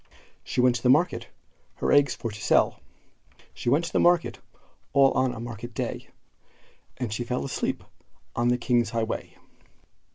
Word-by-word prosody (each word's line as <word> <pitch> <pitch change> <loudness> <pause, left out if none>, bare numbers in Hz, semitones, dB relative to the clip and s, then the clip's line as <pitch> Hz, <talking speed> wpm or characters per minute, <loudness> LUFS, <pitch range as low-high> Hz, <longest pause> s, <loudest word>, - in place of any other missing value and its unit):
She 125 - -1
went 125 -1 +4
to - - -9
the 125 - +2
market 155 +7 +3 0.5
her - - -1
eggs 145 -2 +4
for 115 - -5
to 105 - -9
sell; - - +3 0.7
She - - -3
went 150 +7 +3
to - - -6
the - - +3
market, 175 -1 +3 0.5
all 135 -1 +6
on 130 -1 +1
a 120 - -7
market 120 0 -7
day, - - -4 0.9
And 120 -5 -3
she 120 - -2
fell 125 +2 -2
asleep 135 - -2 0.5
on 120 0 +1
the 125 0 +3
king's 120 -3 +1
highway. 115 -1 -3
125 Hz, 165 wpm, -26 LUFS, 120-135 Hz, 0.9 s, all